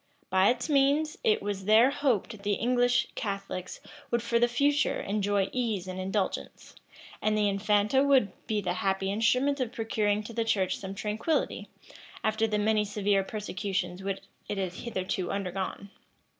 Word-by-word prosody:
By 190 +1 +5
its 245 +2 0
means, 290 +1 +2
it 215 - +2
was 200 -2 -3
there 225 +5 +6
hoped 235 -7 -1
the 205 0 0
English 245 +3 +2
Catholics 195 -3 -4 0.3
would 235 -1 0
for 235 0 +1
the 240 - +4
future 285 +5 +1
enjoy 200 -1 0
ease 220 -7 -1
and 185 0 -5
indulgence; 190 +1 -3 0.5
and 215 0 +1
the 210 -1 +3
infanta 210 +5 +2
would 265 -8 +4 0.2
be 215 -2 0
the 180 - -1
happy 195 +1 0
instrument 255 +7 +2
of 250 -3 -1
procuring 215 -2 0
to 230 - -8
the 230 0 0
church 195 -5 +1
some 195 0 -6
tranquillity, 215 +10 -1 0.5
after 220 +1 +1
the 210 -1 0
many 210 0 +2
severe 205 -1 +1
persecutions 190 -3 -3
which 195 0 -3 0.3
it 205 - -2
had 185 -2 -2
hitherto 185 -3 -3
undergone. 195 0 -4
210 Hz, 155 wpm, -29 LUFS, 195-235 Hz, 0.5 s, there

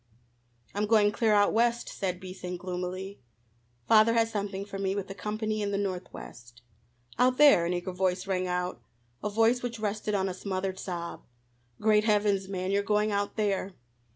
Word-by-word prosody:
"I'm 210 +1 -1
going 210 -1 +4
clear 220 +1 +1
out 205 0 +4
West," 235 +1 +2
said 185 -3 -3
Beason 185 -1 -6
gloomily. 185 +1 -5 0.7
"Father 220 +1 +6
has 225 0 +2
something 200 -2 -3
for 200 -1 -7
me 195 0 0
with 195 -1 -4
a - - -4
company 215 +1 -3
in 205 - -1
the 200 - -1
Northwest." 125 - -6 0.6
"Out 255 0 +4
there!" 280 -13 +6
an 175 - 0
eager 175 +1 -3
voice 185 0 0
rang 185 -2 -1
out, 180 0 -2 0.4
a 210 - 0
voice 225 +4 +3
which 240 -1 -4
rested 210 0 -2
on 195 -1 +1
a 185 - -3
smothered 190 0 -3
sob. 170 -2 -5 0.6
"Great 215 -1 +3
heavens, 205 -3 +2
man, 185 -1 -2
you're 200 0 +2
going 210 +1 +1
out 200 0 -1
there? 200 -3 -1
200 Hz, 175 wpm, -29 LUFS, 185-215 Hz, 0.7 s, Father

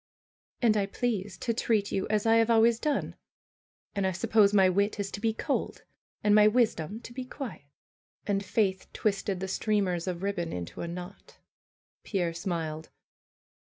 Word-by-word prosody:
^^And 225 -2 +5
I 200 -2 +1
please 205 -3 -2
to 230 - -1
treat 220 -3 0
you 190 - -1
as 215 0 +1
I 225 0 +5
have 225 0 +3
always 230 0 +4
done. 300 -2 -1 0.8
And 200 -2 0
I - - +1
suppose 210 +2 +3
my 195 -2 +5
wit 200 +3 +1
is 195 -1 -2
to 200 - -6
be 225 0 +2
cold 220 - -3 0.4
and 210 - +4
my 210 0 +7
wisdom 215 -4 +1
to 235 - -10
be 255 +1 -4
quiet." 255 - -7 0.6
And 200 -1 0
Faith 195 -3 0
twisted 195 -2 -1
the 190 - -2
streamers 190 -3 0
of 180 0 -3
ribbon 185 -4 -2
into 85 -1 -6
a 170 - -3
knot. 180 +3 -9 0.7
Pierre 175 -5 -1
smiled. 165 -3 -4
200 Hz, 165 wpm, -29 LUFS, 185-225 Hz, 0.8 s, my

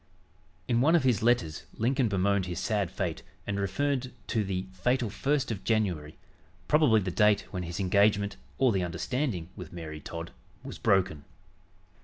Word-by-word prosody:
In 120 -1 +2
one 160 +6 +5
of 165 - +3
his 125 -6 +2
letters 110 -9 +1
Lincoln 125 +2 +1
bemoaned 100 -1 +1
his 90 - -4
sad 105 -5 0
fate 90 -3 -3 0.2
and 100 -1 -2
referred 130 +6 -1 0.2
to 110 -3 +1
"the 95 -1 -2
fatal 120 +3 0
1st 135 +2 0
of 105 - -4
January," 90 -9 0 0.5
probably 150 -8 +5
the 90 -1 -2
date 105 +1 +4
when 90 - -3
his 85 +2 -5
engagement 100 +1 +3 0.2
or 130 -2 +4
"the 95 -3 +1
understanding" 90 - -2
with 90 -5 -9
Mary 80 -3 -7
Todd 85 +2 -7 0.3
was - - -8
broken. 95 -6 +2
100 Hz, 160 wpm, -29 LUFS, 90-120 Hz, 0.5 s, one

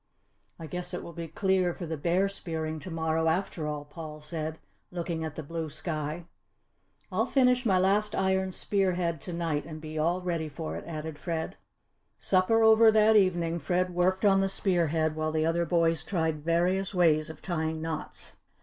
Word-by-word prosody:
"I 165 - -8
guess 180 +2 -4
it - - -5
will 170 - -9
be 165 0 -6
clear 185 -1 +1
for 175 - -6
the 160 0 -3
bear 175 +6 +1
spearing 160 -5 -3
to 185 - -8
morrow, 160 -1 0
after 160 -2 -1
all," 150 -1 -4
Paul 155 0 -8
said, 155 +1 -4 0.3
looking 170 -2 -3
at 155 -2 -5
the 160 - -5
blue 160 +1 -4
sky. 155 +1 -4 0.9
"I'll - - +1
finish 250 -2 +3
my 190 -3 +4
last 200 +3 +2
iron 190 0 +1
spear 195 0 +1
head 170 -4 -1
to 180 - -7
night 165 -3 -1
and 155 -1 -7
be 155 0 -6
all 170 +4 +1
ready 170 -3 -2
for 155 +2 -5
it," - - -7
added 155 -2 -6
Fred. 165 -2 -3 0.6
Supper 200 +4 +3
over 220 0 +7
that 220 0 +5
evening, 175 -4 +2
Fred 180 +3 0
worked 185 +3 +1
on 195 -1 +5
the 195 - +1
spear 185 -3 +1
head 155 0 0
while 155 0 -1
the 155 0 +1
other 170 +1 +1
boys 165 -2 +2
tried 160 -5 -1
various 180 +4 +1
ways 155 -4 +3
of 160 -1 -9
tying 160 -3 -2
knots. 160 -1 -5
170 Hz, 185 wpm, -29 LUFS, 160-185 Hz, 0.9 s, over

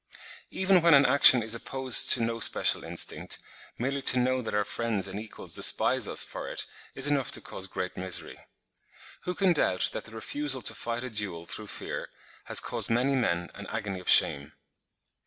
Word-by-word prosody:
Even 190 -1 +2
when 165 -2 +5
an 140 0 +5
action 130 -4 +7
is 110 0 -1
opposed 130 +2 +2
to 120 - +6
no 115 0 -3
special - - +1
instinct, - - -2 0.4
merely 135 +3 -3
to 130 - +5
know 130 +1 0
that 110 - -5
our 105 - +1
friends 105 -2 -3
and 95 +2 -7
equals 110 0 -9
despise - - +3
us - - +2
for - - -8
it - - -3 0.3
is 135 +1 +1
enough 140 -3 0
to - - +3
cause 95 - -5
great 90 0 -6
misery. 95 -1 -3 0.9
Who 180 - -4
can 190 -3 +2
doubt 95 - 0
that - - -6
the 110 - -12
refusal 135 +3 -4
to - - +1
fight 115 +2 -5
a 130 - -6
duel 100 -6 -4
through 105 +5 -7
fear - - -6 0.4
has - - +2
caused - - +2
many 125 +4 +1
men 90 -10 -2
an 100 - -10
agony 105 -3 -5
of 90 - -7
shame? 70 +1 +3
115 Hz, 190 wpm, -27 LUFS, 100-135 Hz, 0.9 s, action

